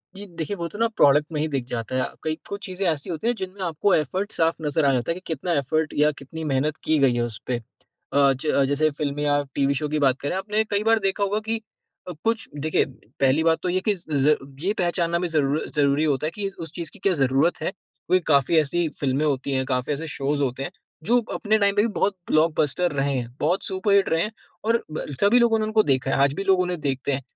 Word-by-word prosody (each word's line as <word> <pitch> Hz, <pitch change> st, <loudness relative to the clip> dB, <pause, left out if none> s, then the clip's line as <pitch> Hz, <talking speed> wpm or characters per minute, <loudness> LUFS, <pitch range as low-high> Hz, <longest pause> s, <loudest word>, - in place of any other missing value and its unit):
जी, 205 Hz, -, -8 dB
देखिए 170 Hz, +1 st, -5 dB
वो 170 Hz, -1 st, -3 dB
तो 205 Hz, -, -10 dB
ना 230 Hz, -, +3 dB
प्रोडक्ट 145 Hz, +1 st, +5 dB
में 150 Hz, -, -2 dB
ही 155 Hz, -, 0 dB
दिख 135 Hz, -4 st, -2 dB
जाता 115 Hz, +1 st, -4 dB
है, 130 Hz, -, +1 dB, 0.2 s
कई 155 Hz, 0 st, -1 dB
कुछ 200 Hz, +2 st, -5 dB
चीज़ें 185 Hz, +1 st, -3 dB
ऐसी 145 Hz, 0 st, -3 dB
होती 170 Hz, +7 st, -3 dB
हैं 240 Hz, -, +3 dB
जिनमें 190 Hz, +1 st, -6 dB
आपको 170 Hz, +4 st, +1 dB
एफ़र्ट 185 Hz, +7 st, -1 dB
साफ़ 165 Hz, 0 st, +2 dB
नज़र 150 Hz, 0 st, +1 dB
आ 140 Hz, -, +5 dB
जाता 125 Hz, +5 st, 0 dB
है -, -, +1 dB
कि 185 Hz, -, -9 dB
कितना 170 Hz, +1 st, -2 dB
एफ़र्ट 155 Hz, +3 st, 0 dB
या 150 Hz, +1 st, +4 dB
कितनी 160 Hz, +4 st, -8 dB
मेहनत 145 Hz, +3 st, 0 dB
की 155 Hz, -, +2 dB
गई 135 Hz, -3 st, +4 dB
है 120 Hz, -, 0 dB
उस 115 Hz, -3 st, -4 dB
पे, 125 Hz, -, 0 dB, 0.6 s
अ, 140 Hz, -1 st, +5 dB
ज 140 Hz, +1 st, +1 dB
जैसे 150 Hz, +2 st, +2 dB
फ़िल्म 145 Hz, -1 st, -3 dB
या 145 Hz, -1 st, +2 dB
टीवी 140 Hz, 0 st, +2 dB
शो 150 Hz, -, -1 dB
की 155 Hz, 0 st, 0 dB
बात 130 Hz, 0 st, +2 dB
करें 145 Hz, -, -2 dB
आपने 210 Hz, +3 st, 0 dB
कई 205 Hz, +1 st, +1 dB
बार 225 Hz, 0 st, +4 dB
देखा 195 Hz, 0 st, 0 dB
होगा 205 Hz, +2 st, 0 dB
कि 225 Hz, 0 st, 0 dB, 0.6 s
कुछ 225 Hz, 0 st, 0 dB
देखिए 155 Hz, +2 st, +1 dB, 0.3 s
पहली 140 Hz, +4 st, +3 dB
बात 165 Hz, 0 st, +3 dB
तो 180 Hz, -, 0 dB
ये 185 Hz, +1 st, +1 dB
कि -, -, +4 dB
ज 150 Hz, -4 st, +2 dB, 0.3 s
ये 200 Hz, +3 st, +1 dB
पहचानना 170 Hz, -2 st, 0 dB
भी 180 Hz, -, -1 dB
ज़रूर 150 Hz, -2 st, 0 dB
ज़रूरी 145 Hz, 0 st, +3 dB
होता 150 Hz, -1 st, +1 dB
है -, -, -3 dB
कि 205 Hz, -1 st, -2 dB
उस 165 Hz, -2 st, -6 dB
चीज़ 165 Hz, -2 st, -5 dB
की 210 Hz, -, -15 dB
क्या 195 Hz, 0 st, +2 dB
ज़रूरत 135 Hz, +6 st, +2 dB
है -, -, -1 dB
क्योंकि 185 Hz, -2 st, -2 dB
काफ़ी 140 Hz, +2 st, +3 dB
ऐसी 165 Hz, +3 st, 0 dB
फ़िल्में 140 Hz, +2 st, 0 dB
होती 140 Hz, -1 st, -1 dB
हैं, 130 Hz, -1 st, 0 dB
काफ़ी 130 Hz, +1 st, -1 dB
ऐसे 160 Hz, +3 st, -5 dB
शोज 145 Hz, +1 st, 0 dB
होते 135 Hz, 0 st, -1 dB
हैं -, -, -5 dB, 0.3 s
जो 240 Hz, +3 st, +4 dB
अपने 215 Hz, 0 st, +1 dB
टाइम 200 Hz, -1 st, +3 dB
पर 205 Hz, -, +4 dB
भी 230 Hz, -, +2 dB
बहुत 205 Hz, -2 st, 0 dB, 0.2 s
ब्लॉकबस्टर 155 Hz, +2 st, +2 dB
रहे 140 Hz, -1 st, 0 dB
हैं, 120 Hz, 0 st, -5 dB
बहुत 185 Hz, -, +1 dB
सुपर 195 Hz, +1 st, 0 dB
हिट 200 Hz, -1 st, +4 dB
रहे 165 Hz, 0 st, +2 dB
हैं 215 Hz, -, -1 dB, 0.3 s
और 230 Hz, +1 st, +2 dB
ब 155 Hz, -, -4 dB, 0.2 s
सभी 215 Hz, +5 st, +5 dB
लोगों 225 Hz, -2 st, +3 dB
ने 215 Hz, -, 0 dB
उनको 215 Hz, 0 st, +3 dB
देखा 135 Hz, -1 st, +1 dB
है, -, -, +1 dB
आज 140 Hz, 0 st, +2 dB
भी 195 Hz, -, -3 dB
लोग 190 Hz, -1 st, +3 dB
उन्हें 180 Hz, -2 st, -1 dB
देखते 135 Hz, -1 st, -1 dB
हैं। 135 Hz, 0 st, -1 dB
155 Hz, 250 wpm, -24 LUFS, 140-190 Hz, 0.6 s, प्रोडक्ट